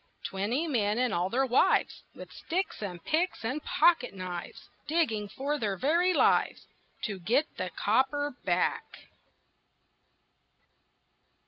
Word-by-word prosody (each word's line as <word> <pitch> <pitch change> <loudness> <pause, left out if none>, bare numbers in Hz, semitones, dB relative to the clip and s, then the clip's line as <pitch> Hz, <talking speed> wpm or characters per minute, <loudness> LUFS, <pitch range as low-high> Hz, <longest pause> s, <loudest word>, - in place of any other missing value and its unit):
Twenty 215 +11 -1
men 215 -7 +1
and 250 -2 +1
all 175 +2 0
their 265 +5 +1
wives, 250 0 +2
With - - -10
sticks 370 - -3
and 180 -5 -6
picks 325 -5 -1
and 265 +6 -2
pocket 315 -9 +3
knives, 180 -2 -7 0.2
Digging 260 -11 0
for 285 +7 -3
their 205 -5 -1
very 340 - +2
lives - - +2 0.4
To 200 -4 -3
get 240 - +2
the 185 - -3
copper 265 - 0
back. - - -2
250 Hz, 120 wpm, -29 LUFS, 200-300 Hz, 0.4 s, pocket